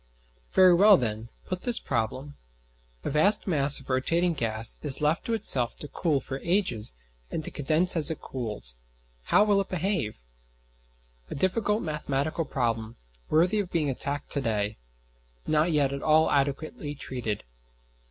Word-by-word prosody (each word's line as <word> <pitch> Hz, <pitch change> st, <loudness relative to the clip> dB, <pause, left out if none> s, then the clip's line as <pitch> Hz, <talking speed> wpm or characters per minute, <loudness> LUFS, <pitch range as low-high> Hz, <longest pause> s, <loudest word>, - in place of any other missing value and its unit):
Very 185 Hz, -1 st, +6 dB
well, 200 Hz, +3 st, +7 dB
then, 115 Hz, -2 st, -3 dB, 0.2 s
put 185 Hz, -1 st, -4 dB
this 240 Hz, -2 st, 0 dB
problem: 130 Hz, +6 st, -3 dB, 0.7 s
A -, -, -2 dB
vast 155 Hz, +9 st, +3 dB
mass 145 Hz, -7 st, +3 dB
of 135 Hz, -, -15 dB
rotating 165 Hz, +7 st, +1 dB
gas 115 Hz, -5 st, -2 dB
is 140 Hz, -3 st, 0 dB
left 150 Hz, +2 st, +1 dB
to 230 Hz, -, 0 dB
itself 135 Hz, -, +1 dB
to 150 Hz, -, -7 dB
cool 150 Hz, -1 st, 0 dB
for 135 Hz, 0 st, -6 dB
ages 150 Hz, -, -1 dB, 0.3 s
and 160 Hz, -, -4 dB
to -, -, -6 dB
condense 155 Hz, +6 st, +3 dB
as 160 Hz, -3 st, +7 dB
it 160 Hz, -, -4 dB
cools: 105 Hz, -, -5 dB, 0.5 s
how 205 Hz, -, +4 dB
will 205 Hz, -2 st, +3 dB
it 195 Hz, -, -7 dB
behave? 170 Hz, -, -2 dB, 1.1 s
A -, -, -5 dB
difficult 210 Hz, +6 st, 0 dB
mathematical 150 Hz, 0 st, -2 dB
problem, 115 Hz, -4 st, -2 dB, 0.3 s
worthy 175 Hz, +7 st, +3 dB
of 195 Hz, -3 st, -3 dB
being 155 Hz, -6 st, 0 dB
attacked 140 Hz, +2 st, -4 dB
to 140 Hz, -, -1 dB
day; 105 Hz, -3 st, -2 dB, 0.7 s
not 155 Hz, +2 st, +2 dB
yet 140 Hz, -3 st, +1 dB
at 140 Hz, -, -5 dB
all 155 Hz, +1 st, +3 dB
adequately 145 Hz, +1 st, -2 dB
treated. 120 Hz, -7 st, -4 dB
150 Hz, 150 wpm, -27 LUFS, 130-175 Hz, 1.1 s, well